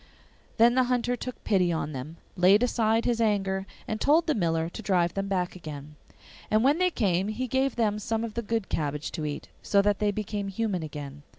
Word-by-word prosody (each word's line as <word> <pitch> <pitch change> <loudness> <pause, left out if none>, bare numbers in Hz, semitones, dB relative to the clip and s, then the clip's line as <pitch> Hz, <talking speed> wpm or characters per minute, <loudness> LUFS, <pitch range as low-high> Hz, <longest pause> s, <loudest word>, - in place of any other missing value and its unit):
Then 235 +1 +6
the 255 0 +3
Hunter 245 0 0
took 250 +1 -7
pity 185 -4 +2
on 160 -2 -2
them, 150 +4 -7 0.2
laid 195 +5 +5
aside 225 -2 +1
his 235 -1 +1
anger, 195 -3 0 0.2
and 215 0 -3
told 315 +4 +4
the 310 - +2
miller 165 - 0
to 175 - -8
drive 180 -5 +1
them 195 0 -2
back 185 -2 -1
again. 150 -3 -8 0.5
And 215 +1 +3
when 285 +5 +3
they 365 0 +4
came 195 - 0
he 220 +4 -2
gave 265 +1 0
them 210 -3 +1
some 225 +2 -2
of 230 -2 -4
the 235 - -2
good 225 -2 -2
cabbage 150 -1 -2
to 155 -2 -3
eat, 145 - -6
so 200 - +2
that 205 -1 +1
they 210 - +2
became 205 0 -3
human 195 -2 -2
again. 145 -2 -7
205 Hz, 210 wpm, -27 LUFS, 175-230 Hz, 0.5 s, Then